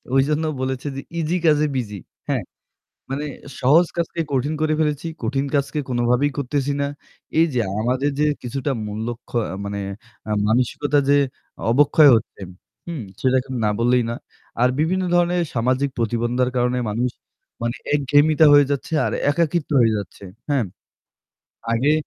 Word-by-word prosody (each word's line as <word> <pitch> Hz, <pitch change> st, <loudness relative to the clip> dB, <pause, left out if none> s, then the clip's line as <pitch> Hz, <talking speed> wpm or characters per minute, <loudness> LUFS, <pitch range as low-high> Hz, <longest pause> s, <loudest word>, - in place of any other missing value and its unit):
ওই 135 Hz, -, +5 dB
জন্য 150 Hz, +1 st, +1 dB, 0.2 s
বলেছি 130 Hz, +1 st, -3 dB
যে 135 Hz, -, -4 dB, 0.2 s
easy 165 Hz, +3 st, 0 dB
কাজে 150 Hz, -1 st, +4 dB
busy, 105 Hz, -6 st, -3 dB, 0.3 s
হ্যাঁ? -, -, 0 dB, 0.7 s
মানে 140 Hz, +2 st, -2 dB, 0.4 s
সহজ 155 Hz, +7 st, +5 dB
কাজকে 170 Hz, 0 st, -2 dB
কঠিন 140 Hz, +4 st, 0 dB
করে 155 Hz, 0 st, +2 dB
ফেলেছি। 150 Hz, 0 st, 0 dB, 0.2 s
কঠিন 135 Hz, +4 st, 0 dB
কাজকে 140 Hz, +1 st, 0 dB
কোনভাবেই 125 Hz, +3 st, +2 dB
করতেছি 140 Hz, +1 st, -1 dB
না। 140 Hz, -, +1 dB, 0.5 s
এই 165 Hz, -, +6 dB
যে 120 Hz, -, +2 dB, 0.2 s
আমাদের 130 Hz, +5 st, +1 dB
যে -, -, +4 dB, 0.2 s
কিছুটা 135 Hz, +3 st, -2 dB
মূল্যক্ষ 115 Hz, +3 st, -5 dB, 0.3 s
মানে 100 Hz, 0 st, -4 dB, 0.5 s
এ -, -, -3 dB, 0.2 s
মানসিকতা 130 Hz, +5 st, +1 dB
যে 145 Hz, -, +5 dB, 0.5 s
অবক্ষয় 145 Hz, +3 st, +6 dB
হচ্ছে 110 Hz, -, -5 dB, 0.5 s
হুম? 160 Hz, -8 st, -4 dB, 0.2 s
সেটা 130 Hz, 0 st, +2 dB
এখন 130 Hz, +1 st, -7 dB
না 105 Hz, -, +3 dB
বললেই 120 Hz, +1 st, +3 dB
না। -, -, -2 dB, 0.5 s
আর 125 Hz, -, +6 dB
বিভিন্ন 185 Hz, +4 st, +1 dB
ধরনের 175 Hz, 0 st, +3 dB
সামাজিক 130 Hz, +4 st, +1 dB
প্রতিবন্ধকতার 120 Hz, +2 st, 0 dB
কারণে 125 Hz, +1 st, +1 dB
মানুষ 120 Hz, +4 st, 0 dB, 0.5 s
মানে 120 Hz, 0 st, -1 dB, 0.2 s
একঘেয়েমিতা 145 Hz, +2 st, +4 dB
হয়ে 145 Hz, -1 st, +7 dB
যাচ্ছে 140 Hz, +3 st, -3 dB
আর -, -, -2 dB, 0.2 s
একাকীত্ব 165 Hz, +1 st, 0 dB
হয়ে 115 Hz, -1 st, +3 dB
যাচ্ছে। 100 Hz, 0 st, -9 dB, 0.3 s
হ্যাঁ? 140 Hz, -5 st, +2 dB, 1.1 s
আগে 130 Hz, +6 st, +3 dB
135 Hz, 145 wpm, -22 LUFS, 120-150 Hz, 1.1 s, হয়ে